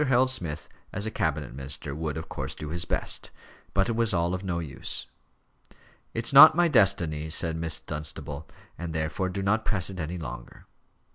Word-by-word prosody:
Harold 130 -1 +3
Smith, 85 - -3 0.2
as 100 +2 -1
a 110 - -2
cabinet 75 - -1
minister, 70 +1 -3
would, 75 -1 -3
of - - -6
course, - - -5
do 75 - -6
his 85 +1 -1
best. - - -1 0.5
But 100 +2 +3
it - - 0
was 115 -3 +2
all 85 +1 +1
of 95 +1 -3
no 90 -3 -2
use. 75 -5 -4 1.1
"It's 115 +3 -1
not 155 +3 +11
my 175 0 +4
destiny," 85 - +3
said 80 0 +1
Miss 80 -1 -1
Dunstable, 75 0 -6 0.3
"and 85 -2 -5
therefore 80 +4 -1
do 95 +1 -3
not 110 +3 +2
press 95 -3 -1
it 95 - -8
any 85 +2 -3
longer." 60 -7 -8
85 Hz, 185 wpm, -27 LUFS, 75-100 Hz, 1.1 s, not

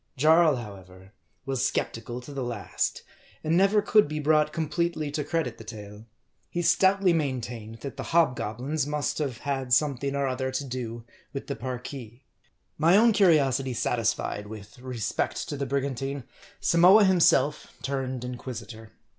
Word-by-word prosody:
Jarl, 160 +2 +5
however, 95 -4 -10 0.3
was 135 -2 -1
skeptical 120 +2 -3
to 140 +3 -10
the 135 -2 -3
last; 120 -4 -3 0.4
and 160 +2 +1
never 200 +3 +4
could 210 -7 +4
be 150 +1 -4
brought 150 0 +3
completely 160 -1 -1
to 150 +1 -2
credit 150 -6 -2
the - - -9
tale. 105 0 -10 0.4
He 175 - -2
stoutly 190 +1 +4
main 140 -6 0
tained 115 -1 -8
that 140 -4 -7
the - - -5
hobgoblins 135 -2 0
must 150 +1 -2
have 135 -6 -2
had 135 -2 -2
something 140 0 +1
or 140 0 0
other 130 0 -1
to 130 +2 -3
do 120 -3 -5 0.3
with 140 - -5
the 140 - -4
Parki. 125 -2 -7 0.6
My 165 +5 +5
own 230 +1 +5
curiosity 140 - +3
satisfied 110 -3 -1
with 105 +1 -11
respect 125 -3 -3
to - - -3
the 140 -1 -3
brigan 140 0 -1
tine, 135 +2 -4 0.4
Samoa 180 +5 +6
himself 150 -6 +3 0.2
turned 130 -2 -3
inquisitor. 120 -3 -7
135 Hz, 155 wpm, -27 LUFS, 120-155 Hz, 0.6 s, Samoa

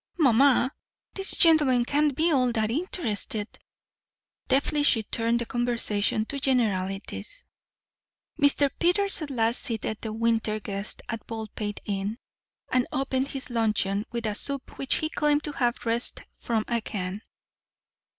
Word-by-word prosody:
"Mamma, 265 -3 +4 0.4
these 390 0 -1
gentlemen 295 -8 +5
can't 290 +1 +1
be 325 +4 +2
at - - +2
all 255 -3 +3
interested." 220 - -1 1.0
Deftly 290 +2 +2
she 230 -6 +4
turned 230 +2 0
the 235 - -3
conversation 225 -3 +1
to 280 +4 -3
generalities. 220 - -1 1.0
Mr. 285 -1 +4
Peters 385 +2 +2
at 305 - -4
last 230 -2 0
seated 220 -2 -3
the 220 - -4
winter 225 -1 0
guests 200 0 -4
of 225 - -3
Baldpate 215 -2 -5
Inn, 200 +2 -2 0.5
and 255 -1 +1
opened 265 0 -1
his 270 -2 -5
luncheon 210 -3 +1
with 235 -1 -3
a 215 - 0
soup 275 +5 -3
which 270 - +2
he 310 - -1
claimed 295 -1 +1
to 295 - -3
have 245 -4 -1
wrested 230 +1 0
from 225 -2 -1
a 235 -1 0
can. 195 -1 -4
240 Hz, 140 wpm, -26 LUFS, 215-280 Hz, 1.0 s, gentlemen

